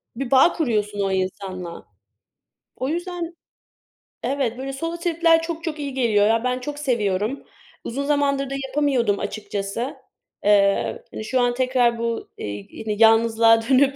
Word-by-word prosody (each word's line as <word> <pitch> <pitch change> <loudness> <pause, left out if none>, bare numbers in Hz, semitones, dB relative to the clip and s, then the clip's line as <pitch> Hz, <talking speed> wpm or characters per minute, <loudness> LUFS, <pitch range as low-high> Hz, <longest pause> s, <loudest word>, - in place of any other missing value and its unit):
Bir 265 0 -4
bağ 270 +6 +6
kuruyorsun 210 -9 -1
o 195 -1 +1
insanla. 185 -2 -4 0.9
O 260 - -2
yüzden 345 +1 -4 0.9
Evet, 250 -2 -1
böyle 270 +1 -5
solo 330 +5 -4
trip'ler 335 -1 +3
çok 330 0 -5
çok 320 -3 -4
iyi 280 -2 -4
geliyor, 215 -5 +3
ya. 225 +1 +2
Ben 250 0 0
çok 290 +3 -6
seviyorum. 225 -3 -1 0.4
Uzun 275 +4 -3
zamandır 280 -2 +1
da - - -4
yapamıyordum 260 -7 +1
açıkçası. 205 +5 -4 0.5
Eee, 200 -1 +3
hani, - - -6
şu 255 +2 +1
an 245 0 +2
tekrar 250 -2 +2
bu, 230 0 -3
iii, 100 -1 -6 0.2
ini 215 -1 -2
yalnızlığa 225 0 +5
dönüp 275 +1 +4
250 Hz, 145 wpm, -23 LUFS, 210-285 Hz, 0.9 s, bağ